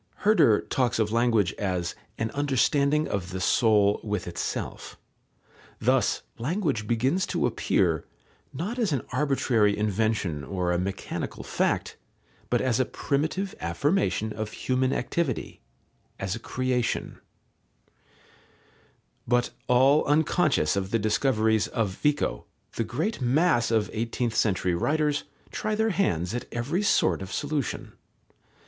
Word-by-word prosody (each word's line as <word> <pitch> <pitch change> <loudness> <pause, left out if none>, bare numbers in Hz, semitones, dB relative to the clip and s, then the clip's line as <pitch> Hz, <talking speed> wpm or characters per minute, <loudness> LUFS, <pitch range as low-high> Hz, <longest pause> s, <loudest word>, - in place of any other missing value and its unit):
Herder 200 - +5
talks 125 -3 0
of 110 -2 +1
language 115 -5 +2
as 90 -4 -1 0.2
"an 115 0 -2
understanding 145 +2 +2
of 90 -3 -3
the 95 +1 -4
soul 105 0 +3
with 105 -3 -2
itself." 85 - -5 0.8
Thus - - +2 0.2
language 140 - -1
begins 130 - +1
to - - 0
appear, - - +1 0.5
not 200 - -4
as 220 -7 +1
an 135 - -1
arbitrary 125 -6 +2
invention 105 -7 0
or 90 +1 -2
a 90 - +1
mechanical 95 +2 -4
fact, - - -1 0.5
but - - +2
as 130 -2 +1
a 130 - +3
primitive 160 +11 -2
affirmation 145 - 0
of 110 0 -5
human 130 0 0
activity, 140 - -2 0.6
as 95 +1 -2
a - - -6
creation. 125 0 -2 2.1
But 120 0 +2 0.2
all 135 +4 +5
unconscious 145 - +2
of 95 -1 -2
the 115 - +2
discoveries 110 0 +2
of 115 -5 -1
Vico, 150 0 0 0.3
the 115 - -1
great 145 - -2
mass 125 0 +3
of 110 -2 +2
eighteenth 115 +1 -2
century 95 -5 +1
writers 150 - 0 0.3
try 215 0 -2
their 220 +1 +1
hands 90 - 0
at 120 - -4
every 130 +11 -1
sort 95 - +2
of 95 - -7
solution. 145 -4 -3
120 Hz, 125 wpm, -26 LUFS, 105-145 Hz, 2.1 s, Herder